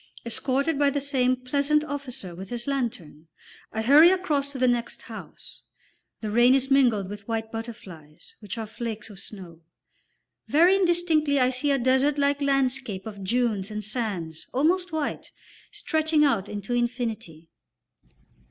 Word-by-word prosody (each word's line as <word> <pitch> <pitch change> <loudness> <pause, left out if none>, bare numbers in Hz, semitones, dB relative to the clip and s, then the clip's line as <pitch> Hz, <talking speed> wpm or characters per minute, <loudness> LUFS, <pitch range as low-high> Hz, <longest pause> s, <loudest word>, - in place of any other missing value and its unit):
Escorted 275 +5 0
by 285 -1 +4
the 285 +1 -1
same 260 -3 +1
pleasant 280 +4 +1
officer 270 - -6
with 185 +3 -9
his 240 -1 -4
lantern, 230 - -4 0.4
I 220 - -2
hurry 295 +8 +8
across 305 -7 0
to 275 - -7
the 255 0 +2
next 240 -1 -1
house. - - -8 0.6
The 215 -2 -3
rain 240 +4 +5
is 270 0 0
mingled 240 -8 +3
with 205 0 -9
white 225 -1 -3
butterflies, 190 -10 -9
which 210 0 -7
are 225 - -3
flakes 220 -1 -6
of 195 - -10
snow. 180 -6 -10 0.9
Very 345 +6 +5
indistinctly 340 -6 +2
I 255 0 +3
see 260 +3 -1
a 280 - +3
desert 265 +3 +2
like 285 0 +1
landscape 265 -7 0
of 205 -3 -8
dunes 215 -2 0
and 210 0 -5
sands 200 -8 -4
almost 355 +7 +1
white, 315 -2 -3 0.4
stretching 315 -1 +1
out 215 -8 +1
into 210 +3 -4
infinity. 230 -10 -3
250 Hz, 150 wpm, -26 LUFS, 215-280 Hz, 0.9 s, hurry